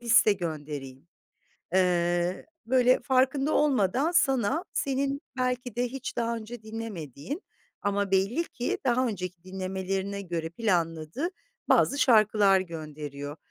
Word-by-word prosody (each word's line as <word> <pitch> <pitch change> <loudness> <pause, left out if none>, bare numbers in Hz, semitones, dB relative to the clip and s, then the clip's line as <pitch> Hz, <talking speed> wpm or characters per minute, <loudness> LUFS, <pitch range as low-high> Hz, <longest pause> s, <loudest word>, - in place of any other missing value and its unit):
liste 230 -2 +5
göndereyim." 150 -6 -6 0.7
Eee, 175 -1 +2 0.2
böyle 255 0 +4
farkında 265 +3 +2
olmadan 270 - +2
sana, 270 - +2
senin 275 +1 -1 0.2
belki 250 -2 -1
de 245 - +1
hiç 265 +1 -6
daha 235 0 0
önce 225 +1 -8
dinlemediğin 215 - -6 0.4
ama 200 -1 0
belli 200 - +2
ki 245 - -2
daha 255 +1 +3
önceki 180 -5 -4
dinlemelerine 190 +1 -3
göre 170 -3 -3
planladığı 170 - -1 0.4
bazı 280 - +4
şarkılar 210 -6 +5
gönderiyor. 150 -4 -6
205 Hz, 110 wpm, -28 LUFS, 175-250 Hz, 0.7 s, liste